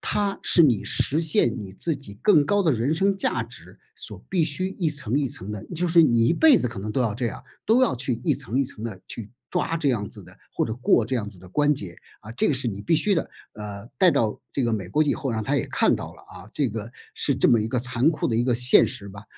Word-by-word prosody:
它 200 -1 -1
是 170 - +6
你 120 -9 +3
实 155 +4 +2
现 150 -8 +2
你 100 -3 -8
自 160 - 0
己 100 -8 -8
更 155 -9 +4
高 200 +6 +1
的 160 -5 +2
人 125 +7 0
生 195 +3 +1
价 - - -1
值 - - -14 0.2
所 445 - -8
必 180 -4 +1
须 160 +4 -1
一 165 -4 +1
层 140 -3 -1
一 145 - 0
层 105 -4 -4
的 105 0 -7
就 180 +2 0
是 170 0 +5
你 120 -5 +3
一 - - +3
辈 310 - +5
子 125 - +1
可 115 -4 -7
能 105 +1 -5
都 130 - -1
要 115 -4 0
这 120 +1 -2
样， 110 - -7 0.2
都 240 +4 +4
要 250 - +2
去 125 -2 -2
一 - - +2
层 125 +5 -4
一 140 - +2
层 110 - -7
地 110 -5 -6
去 105 -3 -8 0.2
抓 165 - -1
这 145 -4 0
样 105 -4 -2
子 - - -9
的 - - -15 0.2
或 - - 0
者 110 - -4
过 120 -1 +2
这 130 - -3
样 105 -4 -2
子 100 - -8
的 90 - -14
关 145 +9 +1
节， 90 -8 -5 0.3
啊， 110 - -11
这 125 - +1
个 145 - +1
是 130 -1 0
你 100 -3 -4
必 135 +11 0
须 200 +4 +2
的。 165 - -2 0.2
呃， 105 0 -8
带 185 -2 +6
到 115 -7 -1
这 135 - -2
个 115 - 0
美 95 -5 -3
国 150 +10 +1
以 145 - +1
后， 135 -4 -3
让 110 -2 -3
她 140 +1 0
也 125 - -1
看 - - +2
到 - - -7
了， - - -18
啊， - - -14
这 135 -6 0
个 110 +1 -6 0.2
是 140 -3 0
这 - - +3
么 115 -2 +4
一 110 - -2
个 125 - -1
残 125 +3 +1
酷 150 - -2
的 115 - -1
一 115 - +1
个 125 -1 +1
现 125 +1 +6
实 100 -6 -5
吧。 100 +2 -12
125 Hz, 300 characters per minute, -24 LUFS, 110-155 Hz, 0.3 s, 是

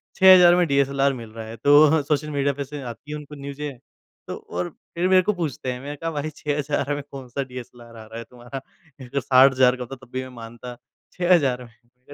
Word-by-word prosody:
6000 185 -2 +8
में 180 -1 +3
डीएसएलआर 140 0 +2
मिल 115 -4 -8
रहा 110 0 -8
है, 110 - -8
तो 145 +5 +5
सोशल 150 +1 -1
मीडिया 140 -1 0
पे 140 - -4
से 145 +1 -8
आती 125 +4 -9
है 150 - -3
उनको 150 0 -10
न्यूज़े, 140 +1 -5 0.6
तो - - -4
और 90 0 -5 0.3
फिर 175 +2 +1
मेरे 185 -1 +6
को 210 - +1
पूछते 155 -8 -3
हैं, 125 - -6
मैंने 145 +1 -6
कहा 165 +3 -4
भाई 150 0 -3
6000 145 -1 -2
में 145 - -4
कौन-सा 135 0 -5
डीएसएलआर 120 -2 -11
आ 110 - -10
रहा 110 +1 -10
है 115 - -6
तुम्हारा 130 +2 -8
60,000 130 0 +5
का 125 - -6
होता 130 +2 -8
है 130 0 -17
तब - - -33
भी 130 - -2
मैं 130 - -9
मानता, 120 +2 -9 0.4
6000 160 -9 +2
में, 120 - -12
मैंने 120 +2 -33
135 Hz, 220 wpm, -23 LUFS, 125-150 Hz, 0.6 s, 6000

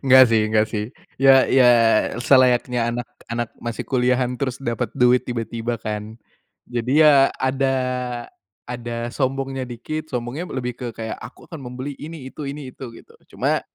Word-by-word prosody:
nggak 130 -1 +7
sih 110 -1 +4
nggak 110 0 +3
sih 105 -1 -1 0.4
ya 135 -1 +7
ya 130 -1 +4 0.5
selayaknya 125 -1 +3
anak 120 0 -3 0.2
anak 120 0 -2
masih 120 -1 -4
kuliahan 125 -1 +1
terus 130 -2 -1
dapet 120 -3 -2
duit 125 0 +5
tiba-tiba 115 -1 -3
kan, 105 0 -5 0.5
jadi 120 +1 -3
ya 150 - +8 0.2
ada 135 +1 0 0.9
ada 120 -1 -5
sombongnya 135 -1 -2
dikit, 155 +6 -5
sombongnya 125 +8 -4
lebih 125 -1 -2
ke 125 +1 -7
kayak 110 -1 -5
aku 110 +3 -11
akan 160 -4 -9
membeli 130 +3 -6
ini 155 -3 -8
itu 145 -2 -6
ini 140 -2 -7
itu 130 - -8
gitu - - -16 0.2
cuma - - +1
125 Hz, 155 wpm, -22 LUFS, 120-135 Hz, 0.9 s, ya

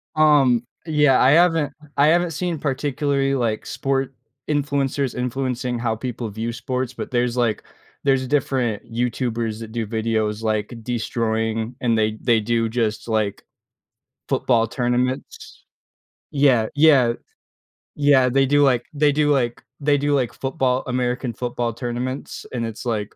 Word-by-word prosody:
Um, 140 -6 +4 0.2
yeah, 150 -4 +3
I 130 - +6
haven't 165 -3 +3 0.2
I 145 +2 +5
haven't 175 +1 +3
seen 170 0 -3
particularly, 140 0 0
like, 115 -4 -1
sport 135 -1 -2 0.4
influencers 140 -2 0
influencing 125 -1 -2
how 115 -2 -1
people 120 0 -5
view 110 +3 -4
sports, 125 +1 -3
but - - -6
there's, 120 0 0
like 115 -3 0 0.4
there's 135 -2 +2
different 130 -6 0
YouTubers 115 -2 -2
that 115 -1 -8
do 115 -1 -2
videos 110 -1 -1
like 110 +1 -1
destroying 110 0 -2
and 120 -2 +2
they 110 0 0
they 115 -2 +3
do 115 +1 0
just, 110 -1 -2
like, 110 -3 -1 0.8
football 115 -3 +2
tournaments. 125 +2 -3 0.7
Yeah, 135 -6 +3
yeah. 140 -6 +5 0.8
Yeah, 140 -3 +4
they 135 +2 +3
do 145 +2 +3
like 125 -3 +2
they 145 0 +3
do 150 0 +2
like 120 -4 0 0.2
they 145 0 +2
do 145 +1 0
like 130 -4 0
football, 130 -2 -1
American 125 -1 -1
football 120 0 -3
tournaments 125 +3 -5
and 115 -2 -2
it's 115 +1 -7
like 110 -3 -2
125 Hz, 140 wpm, -22 LUFS, 115-140 Hz, 0.8 s, I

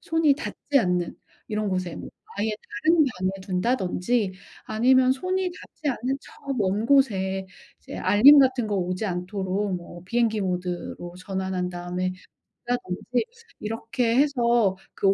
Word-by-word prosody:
손이 325 -3 +3
닿지 285 -1 -1
않는 180 -3 -1 0.3
이런 215 -1 -2
곳에 185 -2 -2
뭐 - - -8 0.3
아예 210 +2 +1 0.4
다른 330 +2 +5 0.2
방에 185 0 +1
둔다든지 195 +1 0 0.3
아니면 255 +3 +4
손이 370 +7 -1
닿지 315 -3 -7
않는 260 +2 -2
저 - - -15 0.3
먼 205 +2 0
곳에 195 -9 +2 0.3
이제 - - -9
알림 215 +10 +7
같은 260 -4 +3
거 210 - -1
오지 185 +2 -2
않도록 190 +1 -2
뭐 175 0 -10
비행기 225 +1 +1
모드로 180 -1 -3
전환한 190 -1 -2
다음에 180 +1 -3 0.5
둔다든지 240 0 -1 0.3
이렇게 230 +2 -1
해서 240 -8 +3 0.2
그 195 0 +3
210 Hz, 275 characters per minute, -25 LUFS, 185-250 Hz, 0.5 s, 알림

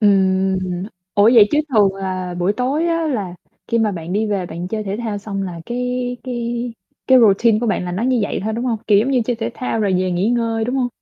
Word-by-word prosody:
Ừm. 190 -2 +3 0.6
Ủa, 205 +2 +5
vậy 210 -3 +7
chứ 295 - +2
thường 205 -4 +4
là 185 -2 -4
buổi 180 +3 +1
tối 270 +8 0
á 330 -1 0
là 200 - -2 0.3
khi 230 - +1
mà 215 -2 +1
bạn 170 0 -6
đi 215 +3 +1
về 195 -4 -1
bạn 170 +2 -6
chơi 215 +2 -3
thể 200 0 -3
thao 220 -3 -3
xong 200 -1 -4
là 175 -3 -5
cái 250 0 -2
cái 240 -1 -3 0.3
cái 260 -1 +6
routine 220 0 +4
của 235 - -2
bạn 200 -4 0
là 180 - -4
nó 195 +6 -2
như 255 0 +2
vậy 205 - -2
thôi, 220 - -1
đúng 235 +3 -3
hông? 235 -3 0
Kiểu 205 -2 +5
giống 240 +6 +1
như 255 - +3
chơi 240 -1 -1
thể 230 +1 -3
thao 230 -3 -2
rồi 200 -2 +1
về 185 0 0
nghỉ 180 +4 0
ngơi, 230 -2 0
đúng 250 +3 -2
hông? 250 -2 +1
220 Hz, 250 wpm, -19 LUFS, 195-245 Hz, 0.6 s, vậy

